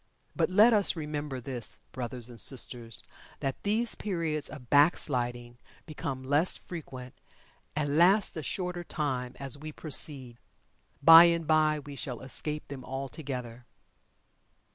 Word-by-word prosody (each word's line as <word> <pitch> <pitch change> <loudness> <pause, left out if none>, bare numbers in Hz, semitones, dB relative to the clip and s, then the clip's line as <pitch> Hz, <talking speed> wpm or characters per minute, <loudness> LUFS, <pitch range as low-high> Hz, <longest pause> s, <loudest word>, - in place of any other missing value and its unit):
But, - - +1
let 215 +5 +6
us 205 -3 +4
remember 150 -4 -4
this, 125 -2 0
brothers 125 -1 -6
and 120 -2 -8
sisters, 120 0 -2 0.4
that 135 -1 -4
these 220 +3 0
periods 165 -7 -3
of 130 -5 -11
"back 145 +4 +5
sliding" 120 -3 -2 0.3
become 140 -4 -5
less 145 +6 +2
frequent, 130 -7 -9 0.6
and 145 0 -1
last 195 +4 +4
a 160 - -4
shorter 180 +3 -4
time, 130 -7 -3
as 140 0 -5
we 155 +1 -7
proceed. 135 -5 0 0.6
Bye 165 +1 +10
and 170 -1 +1
bye 155 0 +3
we 145 -1 -9
shall 130 -4 -6
escape 150 +3 -3
them 135 -2 -8
altogether. 130 -3 -6
145 Hz, 135 wpm, -29 LUFS, 125-160 Hz, 0.6 s, Bye